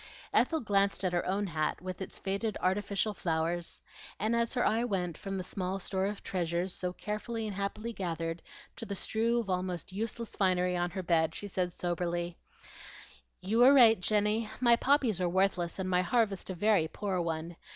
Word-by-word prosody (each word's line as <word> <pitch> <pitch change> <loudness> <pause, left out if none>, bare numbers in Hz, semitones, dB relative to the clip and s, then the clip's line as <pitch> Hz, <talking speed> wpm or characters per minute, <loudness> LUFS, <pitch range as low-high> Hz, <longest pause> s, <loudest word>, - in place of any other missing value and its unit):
Ethel 320 -1 +3
glanced 200 -3 +1
at 180 - 0
her 175 - +1
own 200 +2 0
hat 155 -4 -1
with 185 +2 -6
its 190 - -5
faded 200 +2 -2
artificial 200 +2 0
flowers; 170 -1 -2 0.4
and 220 +3 +1
as 235 +2 0
her 245 - +2
eye 225 +2 +2
went 180 -7 -1
from 195 +2 -5
the 185 - -3
small 185 +1 -3
store 190 0 -1
of 205 0 -5
treasures 175 0 -1
so 180 -1 -3
carefully 215 +4 -4
and 210 -2 -4
happily 210 +4 -3
gathered 165 -3 -3 0.4
to - - -5
the 200 - -3
strew 225 +5 +1
of 230 - -3
almost 180 -1 -3
useless 225 +2 -4
finery 180 -2 +2
on 175 0 0
her 185 +1 -5
bed, 165 -2 +2
she 205 - -5
said 180 -2 -1
soberly, 175 0 -2 1.1
"You 215 +5 0
were 260 +3 +8
right, 230 -5 +7
Jenny. 210 +2 +1
My 240 -1 +6
poppies 250 -7 +2
are 180 - +2
worthless, 180 -2 +1
and 190 -1 -2
my 180 -1 +3
harvest 200 0 0
a 185 - -3
very 200 -3 +3
poor 190 +1 -2
one. 165 0 -3
190 Hz, 185 wpm, -31 LUFS, 175-215 Hz, 1.1 s, were